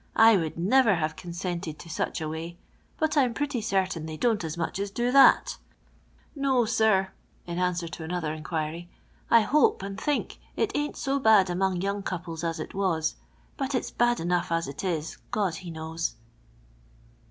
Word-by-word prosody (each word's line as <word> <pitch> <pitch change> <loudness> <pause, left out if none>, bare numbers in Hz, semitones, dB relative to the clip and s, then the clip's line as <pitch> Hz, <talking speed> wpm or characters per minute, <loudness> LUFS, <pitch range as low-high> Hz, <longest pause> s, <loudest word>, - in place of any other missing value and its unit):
/ - - -35
would 205 -9 +5
never 215 +4 +4
have 160 -1 -2
consented 175 -2 -5
to - - -12
such 160 - -3
a 155 - -2
way, 165 +2 -6 0.4
but 315 0 0
I'm 255 -5 +3
pretty 285 -4 -1
certain 190 -6 -1
they 155 -1 -6
don't 225 0 +1
as 160 +1 -4
much 170 +3 -2
as 200 0 -2
do 240 +5 -1
that 275 - +6 0.8
No, 270 -4 +2
sir," 215 -4 +2 0.3
(in 175 0 -4
answer 180 -1 0
to 165 - -7
another 160 -2 -2
inquiry), 160 +2 -4 0.2
" - - -33
I - - +6
hope, 265 -3 +3
and 200 +2 -6
think, 295 -1 -1 0.2
it 410 - 0
ain't 295 0 -2
so 275 0 0
bad 215 -7 +5
among 185 0 0
young 200 +1 -1
couples 170 -3 -5
as 165 -1 -2
it 155 - -6
was, 170 -5 0 0.4
but 270 -1 -2
iu 255 - +2
bad 240 0 +2
enough 175 +1 0
as 165 0 0
it 140 +5 -7
is, 165 -4 -2
God 195 -5 0
he 180 0 -8
knows." 160 -1 -4
185 Hz, 180 wpm, -27 LUFS, 165-225 Hz, 0.8 s, that